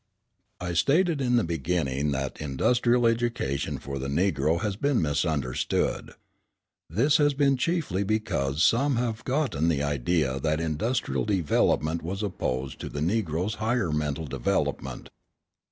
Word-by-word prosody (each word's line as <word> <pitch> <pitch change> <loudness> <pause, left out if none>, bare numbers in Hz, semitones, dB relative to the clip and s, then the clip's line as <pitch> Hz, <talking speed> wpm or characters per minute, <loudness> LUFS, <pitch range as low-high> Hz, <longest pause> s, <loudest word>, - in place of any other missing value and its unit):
I 90 0 -3
stated 155 - +2
in 125 -2 +2
the 120 - +3
beginning 75 -3 -1
that 70 0 -3
industrial 120 - +2
education 115 - 0
for 70 +1 -6
the 65 - -3
Negro 80 0 +1
has 105 -3 -1
been 140 +4 +1
misunderstood. 75 -3 -1 0.8
This 130 - +3
has 145 -2 +3
been 140 -1 +3
chiefly 135 - 0
because 90 -9 0
some 135 +7 +3
have 120 -1 -2
gotten 130 - 0
the 75 -4 +1
idea 70 0 0
that 75 +2 0
industrial 80 - -1
development 85 -4 +1
was 95 +5 -4
opposed 65 -9 -3
to - - -5
the 70 - -5
Negro's 90 +1 0
higher 110 -6 +1
mental 75 +1 -1
development. 70 -4 -2
85 Hz, 135 wpm, -27 LUFS, 75-120 Hz, 0.8 s, the